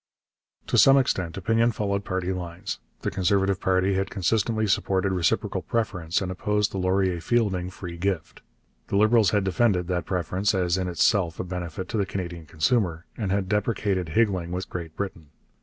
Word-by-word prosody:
To -, -, +2 dB
some 135 Hz, 0 st, +7 dB
extent 95 Hz, -10 st, 0 dB
opinion 115 Hz, +4 st, +2 dB
followed 100 Hz, -2 st, -1 dB
party 95 Hz, -2 st, -2 dB
lines. 90 Hz, -1 st, -5 dB, 0.2 s
The -, -, -2 dB
Conservative 95 Hz, 0 st, +1 dB
party 95 Hz, +1 st, +2 dB
had 95 Hz, +1 st, 0 dB
consistently 110 Hz, +3 st, 0 dB
supported 95 Hz, -1 st, +1 dB
reciprocal 90 Hz, -3 st, 0 dB
preference 90 Hz, -7 st, -1 dB
and 90 Hz, -, -3 dB
opposed 105 Hz, +2 st, 0 dB
the 95 Hz, -, -3 dB
Laurier 95 Hz, -1 st, +1 dB
Fielding 95 Hz, -3 st, 0 dB
free 90 Hz, -2 st, -8 dB
gift. 95 Hz, -1 st, -3 dB, 0.5 s
The 100 Hz, -, 0 dB
Liberals 110 Hz, 0 st, +5 dB
had 105 Hz, -2 st, +1 dB
defended 95 Hz, -1 st, +2 dB
that 90 Hz, -1 st, -1 dB
preference 95 Hz, +3 st, 0 dB
as 90 Hz, -2 st, +1 dB
in 95 Hz, -1 st, -1 dB
itself 85 Hz, 0 st, +1 dB
a -, -, -1 dB
benefit 90 Hz, 0 st, -5 dB
to 115 Hz, -, -2 dB
the 100 Hz, -2 st, 0 dB
Canadian 85 Hz, -4 st, -5 dB
consumer, 85 Hz, +1 st, 0 dB
and 105 Hz, -5 st, -2 dB
had 100 Hz, -1 st, 0 dB
deprecated 100 Hz, -3 st, 0 dB
higgling 95 Hz, -3 st, +1 dB
with 90 Hz, +1 st, -4 dB
Great 85 Hz, -3 st, -6 dB
Britain. 95 Hz, -6 st, -5 dB
95 Hz, 170 wpm, -25 LUFS, 90-100 Hz, 0.5 s, some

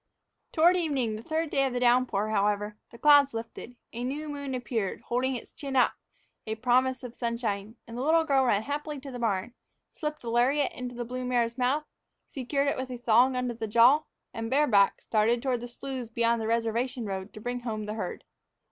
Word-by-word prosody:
Toward 345 Hz, +3 st, +5 dB
evening, 275 Hz, -10 st, 0 dB
the 215 Hz, -, -7 dB
third 315 Hz, +4 st, -2 dB
day 275 Hz, -, +2 dB
of 260 Hz, -, -4 dB
the 250 Hz, -, -1 dB
downpour, 240 Hz, -4 st, +2 dB
however, 210 Hz, 0 st, 0 dB
the 235 Hz, -, -13 dB
clouds 285 Hz, -2 st, +6 dB
lifted. 230 Hz, +2 st, -7 dB, 0.2 s
A 235 Hz, +1 st, -4 dB
new 290 Hz, +5 st, -3 dB
moon 285 Hz, -2 st, -4 dB
appeared, 235 Hz, -5 st, -3 dB
holding 255 Hz, +2 st, -1 dB
its 240 Hz, -, -8 dB
chin 275 Hz, -2 st, -6 dB
up, 255 Hz, -, +4 dB, 0.5 s
a 220 Hz, -, -2 dB
promise 255 Hz, +2 st, +1 dB
of 245 Hz, -2 st, -7 dB
sunshine, 230 Hz, -3 st, -3 dB
and 230 Hz, -, -9 dB
the 245 Hz, -, -3 dB
little 320 Hz, +4 st, +4 dB
girl 275 Hz, -4 st, +3 dB
ran 210 Hz, -3 st, +2 dB
happily 295 Hz, +1 st, -4 dB
to 275 Hz, 0 st, -9 dB
the 245 Hz, -, -6 dB
barn, 225 Hz, 0 st, -1 dB, 0.4 s
slipped 300 Hz, -2 st, -5 dB
a 235 Hz, -, -4 dB
lariat 265 Hz, +5 st, +2 dB
into 250 Hz, -1 st, -7 dB
the 240 Hz, 0 st, -4 dB
blue 255 Hz, +2 st, -5 dB
mare's 240 Hz, -2 st, 0 dB
mouth, 265 Hz, +4 st, 0 dB, 0.4 s
secured 275 Hz, +2 st, -2 dB
it 280 Hz, -, 0 dB
with 260 Hz, 0 st, -4 dB
a 250 Hz, -, -5 dB
thong 245 Hz, +2 st, +4 dB
under 250 Hz, -1 st, -1 dB
the 225 Hz, -1 st, -5 dB
jaw, 240 Hz, +7 st, +6 dB, 0.3 s
and, 225 Hz, 0 st, -4 dB
bareback, 240 Hz, -8 st, +3 dB
started 225 Hz, +2 st, +2 dB
toward 255 Hz, -3 st, 0 dB
the 245 Hz, -, -6 dB
sloughs 250 Hz, -1 st, -6 dB
beyond 230 Hz, 0 st, +1 dB
the 220 Hz, -, -2 dB
reservation 235 Hz, +2 st, -1 dB
road 195 Hz, 0 st, -5 dB
to -, -, -9 dB
bring 245 Hz, +3 st, -3 dB
home 220 Hz, -3 st, -4 dB
the 210 Hz, -, -4 dB
herd. 210 Hz, -5 st, -5 dB
245 Hz, 205 wpm, -28 LUFS, 225-270 Hz, 0.5 s, clouds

